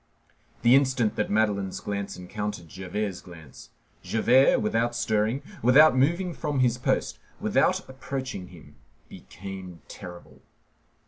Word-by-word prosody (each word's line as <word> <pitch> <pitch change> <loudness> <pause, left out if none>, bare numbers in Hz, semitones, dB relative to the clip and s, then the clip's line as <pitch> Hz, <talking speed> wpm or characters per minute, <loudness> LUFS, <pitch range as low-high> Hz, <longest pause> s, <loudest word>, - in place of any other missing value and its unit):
The 120 +1 +6
instant 130 -5 +3
that 105 - -1
Madeleine's 100 -3 0
glance 100 -1 -4
encountered 95 0 -5
Javert's 95 +3 -4
glance, 80 -6 -13 0.3
Javert, 125 +4 +4
without 115 +2 0
stirring, 110 +2 0 0.2
without 135 +4 +6
moving 170 +7 +1
from 150 -4 -2
his 125 -1 +2
post, - - -1 0.2
without - - +1
approaching 130 -6 -6
him, 75 -5 -16 0.3
became 95 -2 -10
terrible. 90 -1 -11
110 Hz, 115 wpm, -26 LUFS, 95-130 Hz, 0.3 s, The